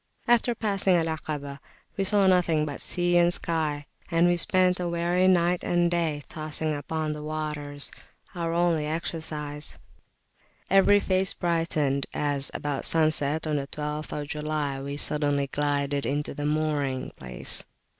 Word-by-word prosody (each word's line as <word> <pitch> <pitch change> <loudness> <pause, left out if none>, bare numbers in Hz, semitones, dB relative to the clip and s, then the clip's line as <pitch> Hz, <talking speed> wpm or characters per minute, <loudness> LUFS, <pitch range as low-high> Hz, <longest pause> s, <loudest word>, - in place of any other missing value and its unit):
After 240 0 +3
passing 200 -4 +1
Al 165 -2 +2
'Akabah, 150 -3 -5 0.4
we 195 - -1
saw 200 0 +4
nothing 175 -5 +3
but 145 -2 -5
sea 175 0 +1
and 175 0 +4
sky, 155 -4 -1 0.2
and 165 +1 +3
we 175 0 +3
spent 180 +1 +2
a 175 -1 -2
weary 175 +2 +1
night 175 -1 +2
and 175 0 +1
day 160 -4 -1
tossing 155 0 -2
upon 155 +1 -3
the 150 - -7
waters, 150 -2 -2 0.4
our 170 -2 -3
only 170 -3 +1
exercise; 155 -2 -3 0.9
every 195 +1 +5
face 190 -1 +1
brightened 160 -5 -1
as, 145 -2 +1
about 145 -2 -3
sunset 155 -1 +2
on 155 -1 0
the 140 -1 -4
12th 150 0 -5
July, 150 -2 -3
we 140 +1 -5
suddenly 145 -1 0
glided 145 0 -1
into 145 +1 -2
the 145 0 -3
mooring 150 -4 -1
place. 65 -2 +5
155 Hz, 145 wpm, -26 LUFS, 145-175 Hz, 0.9 s, every